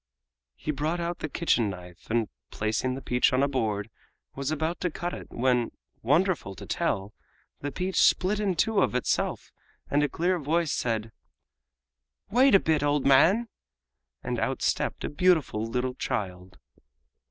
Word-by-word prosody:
He 155 - -3
brought 155 +4 -2
out 170 0 -3
the 155 - -4
kitchen 125 -9 +1
knife, 90 -2 -10
and, 115 -1 +1 0.2
placing 110 +4 -1
the 135 - -8
peach 125 0 +2
on 130 +2 +3
a - - +3
board, 110 -6 -2 0.4
was 140 0 -3
about 160 +2 -1
to 180 - 0
cut 175 +2 -4
it - - -8
when, 125 -1 +1 0.3
wonderful 150 - +1
to - - -9
tell, 100 +2 -1 0.5
the 145 - -4
peach 185 +6 0
split 195 +3 +3
in 200 -3 0
two 210 +4 +2
of 125 - +1
itself 125 - -1 0.4
and 145 - +3
a 150 - +1
clear 175 +5 0
voice 160 +1 0
said: 115 -2 -1 1.2
"Wait 255 +1 +5
a - - +8
bit, 160 -4 +1
old 145 -1 +1
man!" 170 - +5 0.8
and - - -2
out - - -1
stepped - - 0
a - - -1
beautiful 150 -9 +2
little 125 +2 -1
child. 95 -7 -4
140 Hz, 160 wpm, -27 LUFS, 115-170 Hz, 1.2 s, a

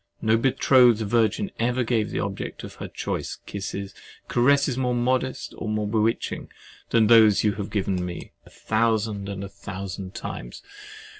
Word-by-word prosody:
No 110 0 +3
betrothed 125 -1 +4
virgin 115 - +1
ever 125 +2 +1
gave 110 -2 0
the - - -4
object 100 -1 -5
of - - -8
her - - -4
choice - - -4
kisses, 100 -1 -5 0.3
caresses 140 +2 +3
more 125 -1 0
modest 130 +2 -1
or 110 - -3
more 105 -1 -1
bewitching 110 +1 -1 0.4
than 115 -2 +4
those 110 -2 +6
you 105 - +3
have 100 -1 -5
given 95 -3 -1
me 90 -1 -6
a - - -17
thousand 110 -2 0
and 100 -1 -5
a - - -5
thousand 95 -1 -7
times. - - -7
110 Hz, 155 wpm, -25 LUFS, 100-120 Hz, 0.4 s, those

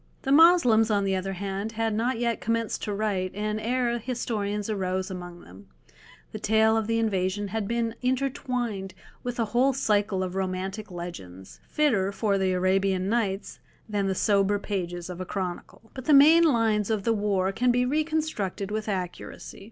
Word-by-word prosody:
The 270 - -1
Moslems, 280 -8 +6
on 205 -2 +2
the 195 -1 0
other 190 +1 -3
hand, 195 +3 -4
had 225 0 -1
not 235 +3 0
yet 235 -1 -1
commenced 230 0 -1
to 210 - -3
write, 200 -3 -2
and 210 +1 -2
ere 240 0 0
historians 210 -4 -3
arose 190 -2 -2
among 175 -1 -8
them, 95 +2 -15 0.6
the - - -6
tale 220 +1 +3
of 220 -1 0
the 230 0 +1
invasion 200 -2 -1
had 215 0 -2
been 230 0 -1
intertwined 250 -6 -2 0.3
with 245 -1 -5
a 230 - +2
whole 260 +3 +3
cycle 205 -6 +1
of 180 -1 -4
romantic 190 +2 -3
legends, 95 - -9
fitter 220 -11 +1
for 200 -1 0
the 190 -1 +1
"Arabian 185 +1 +1
Nights" 205 -4 -1 0.3
than 205 -2 -1
the 190 - 0
sober 200 0 +2
pages 175 -4 -4
of 180 0 -7
a - - -1
chronicle. 190 +4 -6
But 260 -2 -8
the 300 - +5
main 315 +4 +7
lines 225 -7 +2
of 215 -3 0
the 230 - +2
war 200 -3 0
can 245 +5 +1
be 245 +1 +3
reconstructed 300 - -1
with 215 0 -3
accuracy. 185 -3 -5
210 Hz, 175 wpm, -26 LUFS, 190-235 Hz, 0.6 s, main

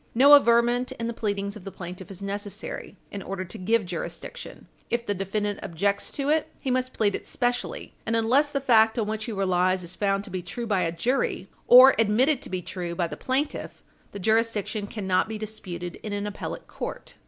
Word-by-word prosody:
No 280 +4 +8
averment 240 -2 +5
in 230 - -5
the 235 - -2
pleadings 200 -2 -2
of 210 - -10
the 195 - -6
plaintiff 180 +1 -8
is 195 0 -9
necessary, 205 - -5
in 200 - -5
order 190 -1 -4
to 205 - -7
give 215 +3 +1
jurisdiction. 180 - -7 0.2
If 235 0 -1
the 205 - 0
defendant 205 +2 -2
objects 200 +4 -1
to 280 0 -1
it, 310 +1 +2
he 265 - -2
must 255 0 0
plead 205 -2 +2
it - - -5
specially, 245 - -2
and 225 - -1
unless 250 +6 +3
the 285 -1 -1
fact 225 -4 +4
on 225 - +1
which 215 +1 -3
he 235 - -4
relies 185 -2 +1
is 175 +1 -6
found 195 0 0
to - - -10
be 185 - -3
true 235 +7 -5
by 200 -4 +1
a 165 -2 0
jury, 195 +1 -1 0.2
or 255 +2 +10
admitted 245 +7 +3
to - - -6
be 185 -1 -3
true 175 -2 -5
by 175 - 0
the 165 - -5
plaintiff, 275 +3 -2 0.3
the - - -7
jurisdiction 215 0 0
cannot 190 -2 0
be 220 - -4
disputed 180 -5 -6
in 210 - -5
an 205 0 -2
appellate 205 -1 -5
court. - - -7
210 Hz, 205 wpm, -26 LUFS, 190-240 Hz, 0.3 s, or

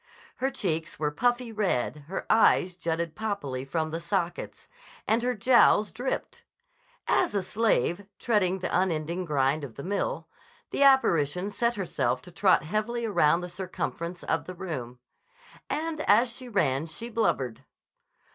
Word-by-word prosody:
Her 265 - 0
cheeks 165 -9 -2
were 150 -1 -1
puffy 245 +7 0
red, 155 - -1
her 190 - -4
eyes 190 -4 +4
jutted 170 -2 -2
poppily 175 -13 -3
from 155 +3 -2
the 165 - -3
sockets, 175 0 -3 0.4
and 225 +2 +3
her 250 +1 0
jowls 215 -2 +4
dripped. 255 +2 -4 0.6
As 355 - +2
a 200 - +1
slave, 205 -2 +1
treading 200 -6 +1
the 185 - -2
unending 175 0 0
grind 145 -1 +1
of 130 -5 -7
the 140 - -7
mill, 200 +2 -2 0.4
the - - -2
apparition 195 - +4
set 235 +3 0
herself 190 -4 -1
to 180 - -11
trot 185 +2 +3
heavily 215 +7 -2
around 170 -6 +3
the 180 - -5
circumference 175 -1 -5
of - - -1
the 185 - -7
room. 135 -10 -5 0.7
And 315 0 -2
as 230 +4 +5
she 255 -1 -8
ran 155 - +1
she 230 +8 -4
blubbered. 160 - 0
185 Hz, 145 wpm, -27 LUFS, 160-225 Hz, 0.7 s, as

